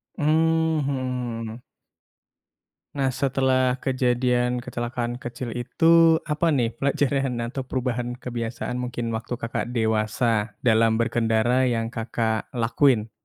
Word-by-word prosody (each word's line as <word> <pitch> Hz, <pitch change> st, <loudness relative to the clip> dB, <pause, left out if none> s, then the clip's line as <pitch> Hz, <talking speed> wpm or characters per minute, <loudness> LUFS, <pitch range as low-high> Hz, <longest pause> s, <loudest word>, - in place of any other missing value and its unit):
Mhm. 160 Hz, +1 st, +2 dB
Hmm. 125 Hz, -4 st, -3 dB, 1.3 s
Nah 135 Hz, -2 st, +1 dB
setelah 130 Hz, -1 st, +1 dB
kejadian 125 Hz, -1 st, +1 dB
kecelakaan 120 Hz, 0 st, -4 dB
kecil 120 Hz, -1 st, -6 dB
itu, 165 Hz, +7 st, +4 dB
apa 150 Hz, +3 st, 0 dB
nih 120 Hz, -4 st, +1 dB
pelajaran 135 Hz, -2 st, 0 dB
atau 130 Hz, +2 st, -5 dB
perubahan 125 Hz, -2 st, -2 dB
kebiasaan 120 Hz, 0 st, -4 dB
mungkin 120 Hz, -2 st, -3 dB
waktu 115 Hz, +2 st, -3 dB
Kakak 120 Hz, +1 st, -4 dB
dewasa 110 Hz, -1 st, 0 dB
dalam 115 Hz, -1 st, +4 dB
berkendara 115 Hz, +2 st, +2 dB
yang 115 Hz, -2 st, -1 dB
Kakak 110 Hz, -1 st, -2 dB
lakuin? 115 Hz, -1 st, +2 dB
125 Hz, 105 wpm, -24 LUFS, 115-130 Hz, 1.3 s, itu